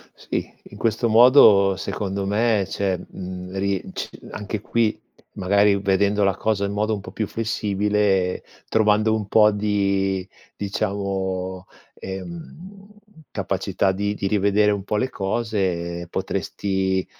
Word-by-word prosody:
Sì, -, -, -4 dB, 0.2 s
in -, -, -11 dB
questo 115 Hz, +1 st, +1 dB
modo 110 Hz, -5 st, +7 dB
secondo 100 Hz, 0 st, -3 dB
me 105 Hz, 0 st, +2 dB
c'è, 95 Hz, +2 st, -1 dB
mhmm, 90 Hz, 0 st, -8 dB
ri 100 Hz, -1 st, -1 dB
ci -, -, -4 dB, 0.2 s
anche 105 Hz, 0 st, -5 dB
qui 110 Hz, -1 st, 0 dB, 0.4 s
magari, 100 Hz, +1 st, +3 dB
vedendo 100 Hz, +1 st, +2 dB
la 100 Hz, -2 st, +2 dB
cosa 110 Hz, -2 st, 0 dB
in 100 Hz, -, -2 dB
modo 105 Hz, +1 st, 0 dB
un 100 Hz, -, -5 dB
po' -, -, -10 dB
più 110 Hz, -, -3 dB
flessibile, 105 Hz, -3 st, 0 dB, 0.3 s
trovando 110 Hz, 0 st, +3 dB
un 105 Hz, -2 st, -3 dB
po' 105 Hz, 0 st, +5 dB
di, 100 Hz, -2 st, 0 dB, 0.3 s
diciamo, 95 Hz, -2 st, -3 dB, 0.3 s
ehm, 170 Hz, -, -9 dB, 0.4 s
capacità 95 Hz, -1 st, -1 dB
di 100 Hz, +2 st, -2 dB
di 100 Hz, -, -3 dB
rivedere 105 Hz, +1 st, +3 dB
un 100 Hz, -1 st, -2 dB
po' 105 Hz, +2 st, -2 dB
le 130 Hz, +4 st, 0 dB
cose, 95 Hz, -5 st, -2 dB
potresti, 95 Hz, -1 st, -1 dB
100 Hz, 130 wpm, -23 LUFS, 95-105 Hz, 0.4 s, modo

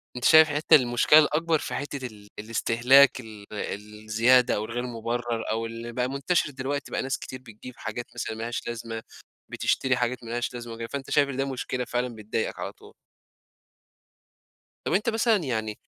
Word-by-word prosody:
أنت 125 Hz, -, -3 dB
شايف 155 Hz, 0 st, +8 dB
حتّة 145 Hz, +2 st, +5 dB
المشكلة 125 Hz, +4 st, +5 dB
الأكبر 160 Hz, +1 st, +2 dB
في -, -, -5 dB
حتّة 140 Hz, -2 st, -4 dB
ال 105 Hz, -2 st, -15 dB
الاستهلاك 120 Hz, +5 st, +4 dB
ال 110 Hz, -3 st, -11 dB, 0.6 s
الزيادة، 115 Hz, +3 st, +4 dB
أو 105 Hz, -, -2 dB
الغير 120 Hz, +2 st, -4 dB
مبرّر، 120 Hz, -1 st, -3 dB
أو 115 Hz, +1 st, -1 dB
اللي 115 Hz, +1 st, -6 dB
بقى 125 Hz, +1 st, -1 dB
منتشر 145 Hz, +3 st, 0 dB
دلوقتي 140 Hz, +1 st, -4 dB
بقى -, -, -1 dB
ناس 135 Hz, 0 st, -2 dB
كتير 130 Hz, -, -8 dB
بتجيب 120 Hz, +1 st, -11 dB
حاجات 115 Hz, +2 st, -5 dB
مثلًا 110 Hz, -, -4 dB
ما 110 Hz, -, -5 dB
لهاش 120 Hz, +1 st, -4 dB
لازمة، 115 Hz, -1 st, -5 dB, 0.5 s
بتشتري 130 Hz, -1 st, +1 dB
حاجات 125 Hz, 0 st, -2 dB
ما 115 Hz, -, -9 dB
لهاش 120 Hz, +1 st, -2 dB
لازمة 120 Hz, -1 st, -7 dB
وكده، 115 Hz, 0 st, -6 dB
فأنت 140 Hz, +1 st, -6 dB
شايف 140 Hz, -1 st, +3 dB
إن 135 Hz, -, -5 dB
ده 135 Hz, -, +1 dB
مشكلة 130 Hz, -1 st, -3 dB
فعلًا 120 Hz, -1 st, -2 dB
بتضايقك 110 Hz, +1 st, -3 dB
على -, -, -4 dB
طول. -, -, -17 dB, 1.9 s
طب -, -, 0 dB
أنت 215 Hz, +5 st, +2 dB
مثلًا 225 Hz, 0 st, +3 dB
يعني 110 Hz, -, -3 dB
120 Hz, 175 wpm, -26 LUFS, 115-135 Hz, 1.9 s, شايف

